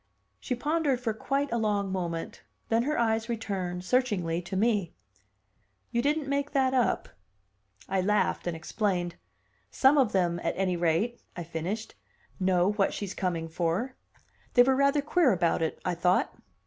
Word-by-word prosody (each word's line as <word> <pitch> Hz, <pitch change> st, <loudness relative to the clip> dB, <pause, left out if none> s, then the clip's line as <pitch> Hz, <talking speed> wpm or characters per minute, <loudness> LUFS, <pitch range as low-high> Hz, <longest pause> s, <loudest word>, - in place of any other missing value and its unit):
She 250 Hz, -, -2 dB
pondered 290 Hz, 0 st, 0 dB
for 235 Hz, -3 st, -1 dB
quite 275 Hz, +5 st, -1 dB
a 235 Hz, -, 0 dB
long 205 Hz, -3 st, 0 dB
moment; 170 Hz, -3 st, -4 dB, 0.3 s
then 225 Hz, 0 st, +3 dB
her 300 Hz, +5 st, -1 dB
eyes 225 Hz, 0 st, +1 dB
returned, 190 Hz, -6 st, -3 dB
searchingly, 185 Hz, -9 st, +1 dB
to 180 Hz, +2 st, -6 dB
me. 205 Hz, -5 st, +1 dB, 1.0 s
"You 235 Hz, -, +1 dB
didn't 295 Hz, +2 st, 0 dB
make 280 Hz, +1 st, -1 dB
that 265 Hz, -2 st, +2 dB
up?" 250 Hz, -3 st, +1 dB, 0.8 s
I 190 Hz, 0 st, +1 dB
laughed, 210 Hz, -1 st, +1 dB
and 170 Hz, -2 st, -2 dB
explained. 175 Hz, 0 st, -1 dB, 0.6 s
"Some 275 Hz, +2 st, +4 dB
of 250 Hz, -6 st, +3 dB
them, 175 Hz, -3 st, +1 dB
at 165 Hz, -, -1 dB
any 185 Hz, -1 st, +1 dB
rate," 175 Hz, +8 st, 0 dB
I 175 Hz, -, -4 dB
finished, 170 Hz, +7 st, -4 dB, 0.5 s
"know 185 Hz, 0 st, +3 dB
what 205 Hz, -2 st, 0 dB
she's 200 Hz, -2 st, -4 dB
coming 170 Hz, -3 st, -2 dB
for. 170 Hz, +10 st, -1 dB, 0.6 s
They 245 Hz, -, +8 dB
were 265 Hz, +1 st, +3 dB
rather 280 Hz, +1 st, +3 dB
queer 310 Hz, -2 st, +3 dB
about 170 Hz, -2 st, +1 dB
it, 160 Hz, -, -1 dB
I 180 Hz, -, +1 dB
thought." 180 Hz, +2 st, +1 dB
205 Hz, 160 wpm, -28 LUFS, 175-255 Hz, 1.0 s, They